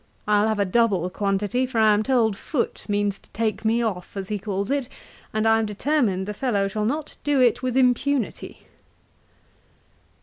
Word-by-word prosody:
I'll 210 Hz, 0 st, +3 dB
have 220 Hz, -1 st, 0 dB
a 200 Hz, -, +2 dB
double 195 Hz, -3 st, +2 dB
quantity; 205 Hz, +6 st, 0 dB
for 250 Hz, -2 st, -5 dB
I 220 Hz, -1 st, +5 dB
am 210 Hz, -, +2 dB
told 225 Hz, -3 st, +2 dB
Foote 250 Hz, +5 st, -3 dB
means 205 Hz, -1 st, 0 dB
to -, -, -24 dB
take 215 Hz, -2 st, -1 dB
me 230 Hz, +2 st, +2 dB
off, 195 Hz, -3 st, -4 dB
as 195 Hz, -1 st, -5 dB
he 210 Hz, -1 st, -2 dB
calls 200 Hz, +2 st, -3 dB
it, 280 Hz, -3 st, -1 dB, 0.4 s
and 215 Hz, +1 st, 0 dB
I 225 Hz, 0 st, +4 dB
am 220 Hz, -, -1 dB
determined 210 Hz, -4 st, 0 dB
the 210 Hz, -, -4 dB
fellow 210 Hz, -4 st, 0 dB
shall 210 Hz, +2 st, -2 dB
not 295 Hz, +6 st, -3 dB
do 290 Hz, -2 st, +2 dB
it 245 Hz, -3 st, +3 dB
with 255 Hz, 0 st, -1 dB
impunity.' 255 Hz, -1 st, 0 dB
220 Hz, 180 wpm, -24 LUFS, 200-250 Hz, 0.4 s, I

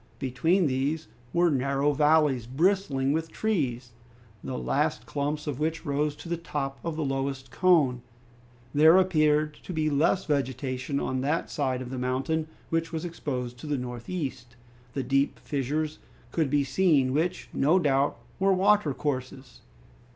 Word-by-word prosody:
Between 160 Hz, +8 st, +1 dB
these 145 Hz, +4 st, -1 dB, 0.2 s
were 170 Hz, -1 st, +3 dB
narrow 140 Hz, +1 st, +1 dB
valleys, 150 Hz, -5 st, +3 dB
bristling 145 Hz, -2 st, +1 dB
with 160 Hz, +1 st, -2 dB
trees, 130 Hz, -, -1 dB, 0.5 s
the -, -, -4 dB
last 65 Hz, +1 st, 0 dB
clumps 145 Hz, +1 st, -2 dB
of 145 Hz, -3 st, -3 dB
which 160 Hz, +2 st, -2 dB
rose 145 Hz, 0 st, 0 dB
to 150 Hz, -, -11 dB
the 170 Hz, 0 st, -1 dB
top 140 Hz, -4 st, -4 dB
of 165 Hz, -2 st, -3 dB
the 155 Hz, -1 st, -2 dB
lowest 135 Hz, -1 st, -3 dB
cone. 145 Hz, -7 st, +3 dB, 0.7 s
There 160 Hz, +4 st, +7 dB
appeared 155 Hz, -5 st, +3 dB
to -, -, -8 dB
be 155 Hz, -2 st, 0 dB
less 160 Hz, +6 st, +2 dB
vegetation 135 Hz, -1 st, -1 dB
on 130 Hz, 0 st, -1 dB
that 150 Hz, +5 st, -1 dB
side 130 Hz, -3 st, -1 dB
of 125 Hz, -, -8 dB
the 130 Hz, -, -4 dB
mountain 135 Hz, +5 st, -1 dB, 0.2 s
which 165 Hz, 0 st, 0 dB
was 160 Hz, 0 st, -3 dB
exposed 125 Hz, -7 st, -4 dB
to 155 Hz, -, -8 dB
the 145 Hz, -1 st, 0 dB
northeast, 125 Hz, 0 st, -5 dB, 0.4 s
and 135 Hz, -3 st, -2 dB
deep 135 Hz, +1 st, +2 dB
fissures 150 Hz, +3 st, -2 dB, 0.3 s
could 160 Hz, -4 st, +1 dB
be 145 Hz, +1 st, +2 dB
seen 135 Hz, -2 st, +2 dB
which, 170 Hz, +5 st, -1 dB
no 155 Hz, +7 st, +3 dB
doubt, 140 Hz, -5 st, +2 dB, 0.2 s
were 195 Hz, 0 st, +4 dB
watercourses. 145 Hz, -, 0 dB
145 Hz, 150 wpm, -27 LUFS, 130-160 Hz, 0.7 s, There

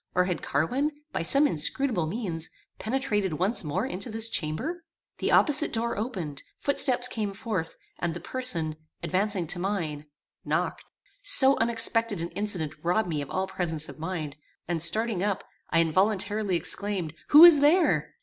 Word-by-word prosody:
or 180 Hz, 0 st, +3 dB
had 180 Hz, -4 st, -2 dB
Carwin, 245 Hz, -, 0 dB, 0.2 s
by -, -, -1 dB
some 275 Hz, -, +4 dB
inscrutable 175 Hz, -, +1 dB
means, 170 Hz, -4 st, -2 dB, 0.3 s
penetrated 215 Hz, -6 st, -1 dB
once 185 Hz, +9 st, 0 dB
more 150 Hz, -2 st, -2 dB
into 195 Hz, +7 st, -5 dB
this 225 Hz, +1 st, -3 dB
chamber? 310 Hz, -, -3 dB, 0.4 s
The -, -, 0 dB
opposite 300 Hz, 0 st, +4 dB
door 235 Hz, +1 st, -1 dB
opened; 185 Hz, -, -4 dB, 0.2 s
footsteps 255 Hz, -3 st, +3 dB
came 215 Hz, -5 st, -3 dB
forth, 195 Hz, -7 st, -4 dB, 0.2 s
and 175 Hz, -1 st, -2 dB
the -, -, -5 dB
person, 170 Hz, -13 st, 0 dB, 0.3 s
advancing 185 Hz, +2 st, 0 dB
to 175 Hz, +3 st, -2 dB
mine, 165 Hz, -6 st, -3 dB, 0.4 s
knocked. -, -, -2 dB, 0.4 s
So 275 Hz, -, +3 dB
unexpected 230 Hz, -2 st, +1 dB
an 170 Hz, +1 st, -3 dB
incident 185 Hz, -8 st, -3 dB
robbed 180 Hz, +4 st, 0 dB
me 150 Hz, -3 st, -2 dB
of 140 Hz, -, -7 dB
all 190 Hz, +1 st, -1 dB
presence 165 Hz, -5 st, -2 dB
of -, -, -11 dB
mind, 160 Hz, -4 st, -4 dB, 0.3 s
and, 170 Hz, -2 st, -2 dB
starting 215 Hz, +4 st, +1 dB
up, 200 Hz, -1 st, -1 dB, 0.3 s
I -, -, +1 dB
involuntarily 195 Hz, +3 st, +1 dB
exclaimed, 185 Hz, -2 st, -2 dB
"Who 305 Hz, +3 st, +10 dB
is 335 Hz, -4 st, +9 dB
there?" 320 Hz, +5 st, +3 dB
195 Hz, 155 wpm, -27 LUFS, 165-230 Hz, 0.4 s, Who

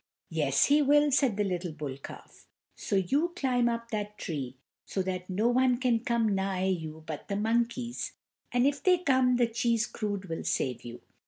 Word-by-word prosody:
"Yes, -, -, +2 dB
he 290 Hz, +1 st, +4 dB
will," 290 Hz, +1 st, +4 dB
said 260 Hz, -6 st, +2 dB
the 210 Hz, -, +2 dB
little 180 Hz, -3 st, -3 dB
bull 150 Hz, -3 st, -5 dB
calf, 140 Hz, -, -12 dB, 0.3 s
"so -, -, -3 dB
you 280 Hz, -, +1 dB
climb 250 Hz, -7 st, +1 dB
up 230 Hz, 0 st, -4 dB
that 210 Hz, -1 st, -3 dB
tree, 135 Hz, -6 st, -4 dB, 0.3 s
so 190 Hz, -, -2 dB
that 185 Hz, 0 st, -4 dB
no 205 Hz, +5 st, +1 dB
one 250 Hz, 0 st, +3 dB
can 245 Hz, -2 st, +2 dB
come 230 Hz, -2 st, +1 dB
nigh 190 Hz, -1 st, -1 dB
you 160 Hz, -4 st, -3 dB
but 155 Hz, -2 st, -6 dB
the 200 Hz, -, -2 dB
monkeys, 235 Hz, +3 st, -1 dB, 0.4 s
and 245 Hz, +1 st, +2 dB
if 285 Hz, -1 st, +1 dB
they 365 Hz, +3 st, +4 dB
come 260 Hz, -6 st, +3 dB
the 245 Hz, 0 st, +3 dB
cheese 230 Hz, -1 st, 0 dB
crud 205 Hz, -3 st, -4 dB
will 165 Hz, -1 st, -4 dB
save 125 Hz, -2 st, -1 dB
you. 120 Hz, 0 st, -9 dB
225 Hz, 185 wpm, -29 LUFS, 185-250 Hz, 0.4 s, he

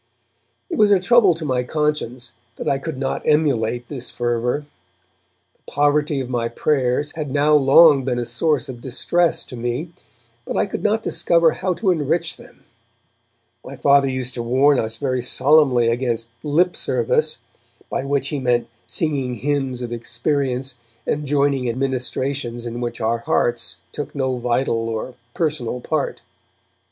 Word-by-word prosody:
It -, -, -2 dB
was 210 Hz, -1 st, +6 dB
a 200 Hz, -2 st, +5 dB
trouble 200 Hz, -2 st, +4 dB
to 160 Hz, -1 st, -6 dB
my 130 Hz, -3 st, 0 dB
conscience 130 Hz, -3 st, -2 dB, 0.2 s
that -, -, -6 dB
I 135 Hz, -, +1 dB
could 160 Hz, -1 st, -5 dB
not 135 Hz, 0 st, -2 dB
emulate 125 Hz, -6 st, +1 dB
this 125 Hz, -1 st, -4 dB
fervour. 120 Hz, +4 st, -1 dB, 0.9 s
The -, -, -16 dB
poverty 145 Hz, 0 st, +2 dB
of 130 Hz, -, -3 dB
my 120 Hz, -2 st, -1 dB
prayers 140 Hz, +1 st, 0 dB
had 155 Hz, -3 st, -4 dB
now 145 Hz, +2 st, +2 dB
long 145 Hz, 0 st, +6 dB
been 125 Hz, -1 st, -1 dB
a 120 Hz, -, -2 dB
source 145 Hz, +2 st, 0 dB
of 120 Hz, -2 st, -8 dB
distress 165 Hz, +7 st, +1 dB
to -, -, -9 dB
me, 120 Hz, +8 st, -4 dB, 0.5 s
but -, -, -4 dB
I -, -, +2 dB
could 200 Hz, -, -5 dB
not 220 Hz, +1 st, +1 dB
discover 170 Hz, -1 st, +3 dB
how 185 Hz, -1 st, -2 dB
to 195 Hz, -1 st, +1 dB
enrich 160 Hz, +1 st, 0 dB
them. -, -, -17 dB, 1.0 s
My 135 Hz, -, -8 dB
Father 140 Hz, +1 st, +4 dB
used 130 Hz, -1 st, -3 dB
to 120 Hz, -, -3 dB
warn 130 Hz, +4 st, +3 dB
us 110 Hz, 0 st, -2 dB
very 130 Hz, 0 st, -1 dB
solemnly 130 Hz, -1 st, +4 dB
against 115 Hz, -1 st, -1 dB
'lip 170 Hz, +5 st, +1 dB
service', 475 Hz, -1 st, 0 dB, 0.5 s
by -, -, -3 dB
which 140 Hz, 0 st, -1 dB
he 145 Hz, -, -2 dB
meant 120 Hz, -2 st, 0 dB, 0.2 s
singing 135 Hz, -1 st, -1 dB
hymns 135 Hz, -2 st, -2 dB
of 120 Hz, -, -5 dB
experience 125 Hz, +2 st, -2 dB, 0.3 s
and 150 Hz, 0 st, -2 dB
joining 140 Hz, -2 st, +1 dB
in 120 Hz, 0 st, -2 dB
ministrations 130 Hz, -2 st, -2 dB
in 120 Hz, +1 st, -5 dB
which 120 Hz, -1 st, -4 dB
our 115 Hz, +1 st, 0 dB
hearts 120 Hz, 0 st, 0 dB
took 145 Hz, -, -6 dB
no 130 Hz, -2 st, -1 dB
vital 120 Hz, -1 st, 0 dB
or 115 Hz, +3 st, -4 dB, 0.2 s
personal 145 Hz, -7 st, -1 dB
part. -, -, -3 dB
135 Hz, 160 wpm, -21 LUFS, 120-150 Hz, 1.0 s, was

